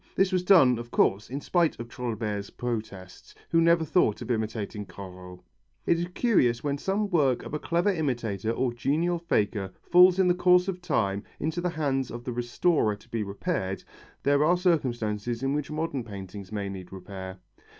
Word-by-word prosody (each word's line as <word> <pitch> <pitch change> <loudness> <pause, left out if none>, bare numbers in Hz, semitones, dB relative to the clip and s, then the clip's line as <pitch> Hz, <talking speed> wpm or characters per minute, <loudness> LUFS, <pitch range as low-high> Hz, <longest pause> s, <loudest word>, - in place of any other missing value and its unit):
This 195 0 +3
was 185 -1 +2
done, 135 -11 +6
of 120 0 -8
course, 100 -1 +2
in 140 +3 -4
spite 170 -1 +1
of 115 - -6
Trouillebert's 110 -4 -4
protests, 110 -6 -6 0.2
who 165 - +4
never 170 0 +4
thought 150 - +2
of 120 - -4
imitating 110 -2 -3
Corot. 90 -2 -10 0.4
It 170 - +2
is 175 - -2
curious 125 - +2
when 140 -1 -1
some 200 +5 0
work 140 -8 +2
of - - -8
a 150 - -1
clever 175 +6 +1
imitator 120 - -2
or 120 +1 0
genial 160 +8 0
faker 105 - 0
falls 180 +1 +6
in 190 -1 +4
the 180 - +5
course 180 0 +4
of 180 -2 -3
time 100 - 0 0.2
into 160 +3 -2
the 180 - 0
hands 140 -6 -1
of 120 +1 -7
the 125 - -4
restorer 120 0 +1
to 100 - -21
be 115 - -2
repaired 100 - -3 0.4
there 145 +1 +3
are 175 +4 +4
circumstances 120 - 0
in 135 +1 +1
which 145 -1 -2
modern 150 -4 -2
paintings 100 -2 -9
may 100 -2 -3
need 95 -2 -8
repair. 95 0 -8
125 Hz, 180 wpm, -27 LUFS, 105-170 Hz, 0.4 s, done